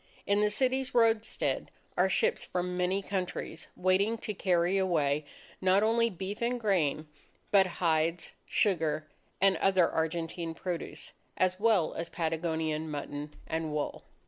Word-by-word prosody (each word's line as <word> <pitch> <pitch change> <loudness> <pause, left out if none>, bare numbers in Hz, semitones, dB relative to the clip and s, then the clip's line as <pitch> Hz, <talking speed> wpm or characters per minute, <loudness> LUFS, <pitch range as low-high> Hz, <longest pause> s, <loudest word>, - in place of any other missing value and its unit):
In 200 +1 +2
the 210 - +3
city's 260 +4 0
roadstead, 225 -2 +2 0.3
are - - +3
ships 470 +1 +1
from 180 0 -2
many 185 +2 0
countries 180 -4 -4
waiting 190 +5 +2
to 215 - -4
carry 180 -1 +2
away 155 -6 +1 0.4
not 190 +2 +4
only 230 +1 +3
beef 195 +2 -6
and 240 +1 0
grain, 160 -8 +1 0.4
but 195 -2 +6
hides, 165 0 +1 0.2
sugar, 160 -6 +1 0.3
and 195 0 +4
other 190 -3 +4
Argentine 165 0 -2
produce, 175 -1 -4 0.3
as 185 0 +1
well 210 -6 +3
as 165 0 -4
Patagonian 160 -1 -1
mutton 145 0 -5
and 160 -1 -2
wool. 150 -1 -3
180 Hz, 135 wpm, -30 LUFS, 160-205 Hz, 0.4 s, but